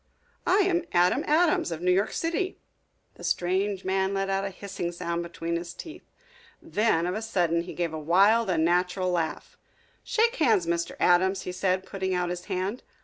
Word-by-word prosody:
"I 400 Hz, -, +5 dB
am 365 Hz, -3 st, +2 dB
Adam 180 Hz, +10 st, +3 dB
Adams, 315 Hz, -, +3 dB
of 165 Hz, -, -4 dB
New 180 Hz, -, +3 dB
York 195 Hz, +3 st, +2 dB
City." 340 Hz, +3 st, -2 dB, 0.6 s
The -, -, -12 dB
strange 190 Hz, +2 st, 0 dB
man 190 Hz, +1 st, 0 dB
let 195 Hz, 0 st, -1 dB
out 195 Hz, 0 st, 0 dB
a 195 Hz, -, -2 dB
hissing 190 Hz, -2 st, -5 dB
sound 170 Hz, 0 st, -3 dB
between 170 Hz, 0 st, -3 dB
his 170 Hz, 0 st, -7 dB
teeth. 320 Hz, -, -10 dB, 0.5 s
Then 210 Hz, -6 st, +1 dB
of 180 Hz, -, -1 dB
a 215 Hz, -, -3 dB
sudden 175 Hz, -7 st, +1 dB
he 175 Hz, -, -8 dB
gave 170 Hz, -2 st, -2 dB
a 155 Hz, -, -4 dB
wild, 200 Hz, +8 st, +4 dB
unnatural 180 Hz, +2 st, +1 dB
laugh. 165 Hz, -3 st, -3 dB, 0.4 s
"Shake 470 Hz, +1 st, +1 dB
hands, 225 Hz, -, +3 dB
Mr. 170 Hz, 0 st, -2 dB
Adams," 190 Hz, +2 st, +3 dB
he 180 Hz, -, -4 dB
said, 185 Hz, +1 st, 0 dB
putting 190 Hz, -1 st, -2 dB
out 180 Hz, -1 st, -1 dB
his 180 Hz, 0 st, -5 dB
hand. 195 Hz, +4 st, -3 dB
185 Hz, 180 wpm, -27 LUFS, 175-205 Hz, 0.6 s, I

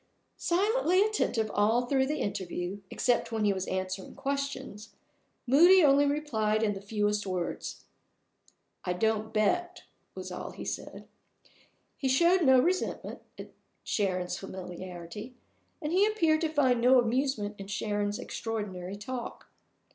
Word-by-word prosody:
Silently 390 Hz, +1 st, +2 dB
attentive 240 Hz, -, 0 dB
all 225 Hz, +4 st, +2 dB
through 265 Hz, +1 st, +2 dB
the 300 Hz, +2 st, -1 dB
interview 185 Hz, -1 st, -3 dB
(except 245 Hz, -1 st, 0 dB
when 220 Hz, -2 st, 0 dB
he 205 Hz, -, +3 dB
was 190 Hz, -1 st, -4 dB
answering 185 Hz, 0 st, -4 dB
questions), 275 Hz, -6 st, -4 dB, 0.5 s
Moody 345 Hz, +8 st, +7 dB
only 285 Hz, 0 st, +5 dB
replied 225 Hz, -8 st, 0 dB
in 210 Hz, -2 st, +2 dB
the 195 Hz, -, -7 dB
fewest 210 Hz, 0 st, -1 dB
words. 180 Hz, -2 st, -4 dB, 1.0 s
"I 180 Hz, -, -1 dB
don't 220 Hz, +3 st, 0 dB
bet," 350 Hz, +12 st, 0 dB, 0.3 s
was -, -, -7 dB
all -, -, -6 dB
he -, -, -8 dB
said. -, -, -6 dB, 0.9 s
He 265 Hz, -, -1 dB
showed 340 Hz, +8 st, +4 dB
no 265 Hz, -4 st, +6 dB
resentment 360 Hz, +8 st, -1 dB, 0.2 s
at -, -, -9 dB, 0.3 s
Sharon's 185 Hz, -3 st, -1 dB
familiarity, 185 Hz, +4 st, -8 dB, 0.5 s
and 300 Hz, -, -2 dB
he 385 Hz, +4 st, +4 dB
appeared 330 Hz, -8 st, +2 dB
to 320 Hz, -, +1 dB
find 260 Hz, -6 st, +2 dB
no 255 Hz, +1 st, +6 dB
amusement 240 Hz, -3 st, 0 dB
in 195 Hz, -, -7 dB
Sharon's 205 Hz, 0 st, -2 dB
extraordinary 200 Hz, -5 st, -5 dB
talk. 240 Hz, +4 st, -7 dB
225 Hz, 130 wpm, -29 LUFS, 205-285 Hz, 1.0 s, Moody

